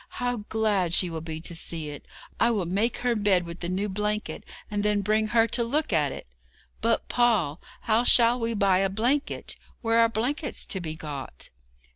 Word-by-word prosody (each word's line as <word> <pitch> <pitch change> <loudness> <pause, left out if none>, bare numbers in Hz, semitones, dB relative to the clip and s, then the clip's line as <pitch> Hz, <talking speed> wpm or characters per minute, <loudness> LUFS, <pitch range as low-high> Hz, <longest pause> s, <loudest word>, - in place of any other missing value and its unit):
How 245 0 -1
glad 205 -6 +1
she 175 -1 +3
will 160 -1 -4
be 160 -1 -5
to 170 - -3
see 165 -2 -3
it! 145 - -10 0.3
I 235 - +4
will 210 -6 0
make 205 +7 0
her 245 -1 +2
bed 200 -4 +2
with 170 +1 -8
the 175 - -3
new 190 +3 -1
blanket, 210 +2 -2 0.3
and 205 -1 -1
then 210 0 +1
bring 215 +2 +2
her 225 +1 +4
to 240 - +2
look 280 0 -1
at 150 -4 +2
it. - - -8 0.6
But, - - +1
Paul, 210 -11 +1 0.2
how 225 +1 +2
shall 240 0 +5
we 230 0 -1
buy 195 -2 +3
a 195 0 +2
blanket? 245 +9 -1 0.2
Where 230 0 +2
are 230 0 +5
blankets 255 +6 -2
to 190 - -3
be 160 -2 -5
got?' 140 - -7
210 Hz, 195 wpm, -26 LUFS, 175-230 Hz, 0.6 s, shall